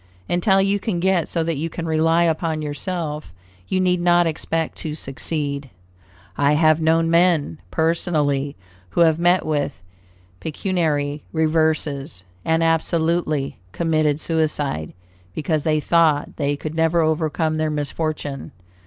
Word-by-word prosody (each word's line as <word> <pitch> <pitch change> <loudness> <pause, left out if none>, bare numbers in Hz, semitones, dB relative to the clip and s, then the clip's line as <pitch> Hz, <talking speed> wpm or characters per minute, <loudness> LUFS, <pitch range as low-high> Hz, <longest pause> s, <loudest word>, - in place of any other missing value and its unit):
Until 190 +2 +3
you 195 +1 +2
can 195 -4 -2
get 185 -2 +1
so 165 - 0
that 165 -2 -2
you 165 +3 -2
can 170 +1 -5
rely 165 +1 +3
upon 160 -1 0
yourself, 150 - -4 0.4
you 185 - 0
need 180 -1 +2
not 175 0 +4
expect 165 0 -2
to 150 -1 -4
succeed. 140 -1 -4 0.7
I 145 +1 +4
have 155 +1 +4
known 165 +1 +3
men, 170 - +3
personally, 150 - 0 0.3
who 170 - 0
have 160 -1 +4
met 175 +1 +3
with 145 -10 -2 0.6
pecuniary 150 -4 -1
reverses, 155 - 0 0.2
and 160 0 +2
absolutely 165 - 0
committed 155 -3 +1
suicide, 150 - -1 0.4
because 155 0 0
they 155 0 +1
thought 155 -2 +2
they 145 -1 0
could 155 +1 -5
never 165 +1 +2
overcome 155 0 0
their 155 0 0
misfortune. 145 -1 -3
160 Hz, 130 wpm, -21 LUFS, 150-170 Hz, 0.7 s, not